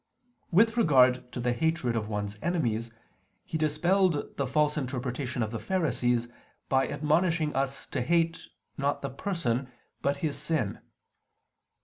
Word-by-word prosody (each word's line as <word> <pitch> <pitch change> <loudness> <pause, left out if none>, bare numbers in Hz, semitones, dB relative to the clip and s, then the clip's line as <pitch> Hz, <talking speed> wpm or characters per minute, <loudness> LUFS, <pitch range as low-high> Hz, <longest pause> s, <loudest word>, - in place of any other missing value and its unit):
With 225 +6 +4
regard 130 - +4
to - - -5
the 120 0 +1
hatred 160 -4 0
of 110 -2 -2
one's 105 -1 -3
enemies, 120 -10 0 0.6
He - - -6
dispelled 170 +2 +1
the 140 - -1
false 150 +3 +2
interpretation 125 -2 -2
of 110 - -3
the 115 - -3
Pharisees, 125 -10 0 0.4
by 135 0 +3
admonishing 155 +1 +1
us 135 0 -1
to - - -1
hate, 165 +4 +1 0.3
not 140 +1 0
the 140 - -3
person, 135 -6 -1 0.3
but 140 0 +1
his 150 - -1
sin. 145 -11 -1
140 Hz, 135 wpm, -28 LUFS, 125-165 Hz, 0.6 s, With